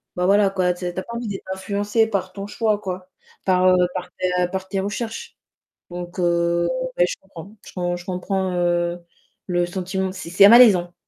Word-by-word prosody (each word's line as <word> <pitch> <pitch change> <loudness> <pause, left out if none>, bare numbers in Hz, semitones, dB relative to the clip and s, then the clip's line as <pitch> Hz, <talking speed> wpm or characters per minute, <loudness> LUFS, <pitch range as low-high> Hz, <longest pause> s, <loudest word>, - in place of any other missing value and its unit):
bah, 180 0 0
voilà 200 0 +4
quoi, 185 -2 +1
tu 175 - -14
sais 175 -1 -3
tu 185 - -4
as - - -5
pas 235 - -8
envie 235 0 -4
d'être 200 -2 -6
influencée 205 +3 0
par 195 -4 -3
ton 195 +1 -7
choix, 210 +1 0
quoi, 185 -2 -6 0.3
par, 185 -1 +3
heu, 185 - +5 0.2
par 180 -1 -5
tes 185 - 0 0.2
par 190 0 -4
tes 195 +1 -2
recherches. 225 - -5 0.5
Donc, 175 +1 -7
heu, 170 0 +1 0.3
ouais, 175 - +5
je - - -4
comprends, 195 +2 -12
je - - -11
com 175 -1 -2
je 175 - -12
comprends, 185 0 -2
heu, 175 0 0 0.5
le 175 -1 +1
sentiment, 185 +1 -3
c'est 190 -3 -8
c'est 195 +3 +7
malaisant. 205 -7 +7
185 Hz, 200 wpm, -22 LUFS, 175-200 Hz, 0.5 s, c'est